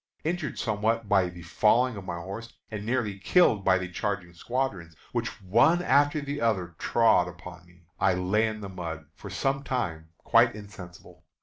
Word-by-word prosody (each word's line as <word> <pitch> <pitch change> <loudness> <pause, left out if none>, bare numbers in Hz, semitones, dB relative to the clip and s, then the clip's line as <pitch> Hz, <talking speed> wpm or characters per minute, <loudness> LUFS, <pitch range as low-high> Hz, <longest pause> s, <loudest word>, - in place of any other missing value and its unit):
Injured 160 -4 -2
somewhat 110 +1 0
by 95 -3 +3
the 85 -1 -11
falling 115 +8 +2
of 100 - -7
my 90 -2 -4
horse, 100 +7 -7 0.2
and 105 -2 -5
nearly 110 -4 -1
killed 110 - +3
by 95 -1 +4
the 90 -1 -4
charging 90 -1 -3
squadrons, 95 -4 -3 0.2
which 115 -2 -3
one 135 - +4
after 145 -1 +3
the 145 0 -4
other 95 -7 0
trod 115 -6 +3
upon 90 0 -11
me, 85 0 -22 0.2
I 90 - +3
lay 100 +5 +1
in 110 -1 -5
the 100 - -5
mud 85 -4 -6
for 100 - -10
some 135 +8 -1
time 85 - -3
quite 120 0 +3
insensible. 90 -3 -12
100 Hz, 175 wpm, -27 LUFS, 90-120 Hz, 0.2 s, by